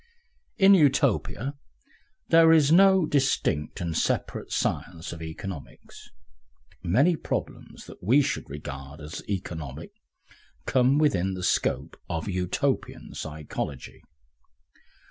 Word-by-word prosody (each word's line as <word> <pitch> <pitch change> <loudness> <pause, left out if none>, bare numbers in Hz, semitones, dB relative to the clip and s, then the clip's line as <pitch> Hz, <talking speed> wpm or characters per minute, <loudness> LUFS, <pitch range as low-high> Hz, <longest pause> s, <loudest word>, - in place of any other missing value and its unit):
In 195 0 +7
Utopia 140 - +2 0.8
there 165 0 +7
is 155 -3 +5
no 190 0 +6
distinct 135 - 0
and 85 -2 -3
separate - - -1
science 85 +2 -2
of 85 - -10
economics. 80 0 -9 0.7
Many 140 - +3
problems - - -5
that - - -13
we 130 +10 +4
should 135 - -3
regard 70 0 -8
as 75 +1 -7
economic 85 -7 -5 0.7
come 130 +2 +3
within 95 - +1
the 90 - -6
scope - - 0
of 80 +1 -3
Utopian 90 -2 -2
psychology. 75 -3 -6
95 Hz, 105 wpm, -26 LUFS, -, 0.8 s, In